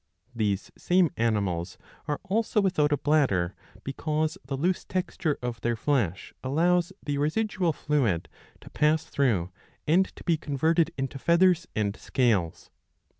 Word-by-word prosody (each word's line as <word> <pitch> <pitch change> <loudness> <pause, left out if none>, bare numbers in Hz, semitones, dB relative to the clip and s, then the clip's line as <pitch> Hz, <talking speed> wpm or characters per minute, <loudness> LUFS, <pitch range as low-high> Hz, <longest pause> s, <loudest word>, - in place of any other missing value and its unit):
These 105 -4 -1
same 180 -3 +2
animals 100 -7 -1 0.3
are 150 -1 -1
also 215 +3 0
without 180 -7 +2
a 145 - +3
bladder, 125 - +2 0.3
because 155 +3 -1
the 135 +1 -4
loose 180 +6 0
texture 175 -4 -2
of 120 -3 -4
their 120 0 0
flesh 110 - -1
allows 175 +6 +2
the 145 -1 -1
residual 180 +3 0
fluid 135 - 0 0.3
to - - -13
pass 155 +1 +2
through 115 - 0 0.3
and 180 +5 +4
to - - -12
be 170 -3 +2
converted 160 +3 +1
into 135 0 -3
feathers 175 +2 +3
and 105 -1 0
scales. 110 -13 0
145 Hz, 135 wpm, -27 LUFS, 115-170 Hz, 0.3 s, and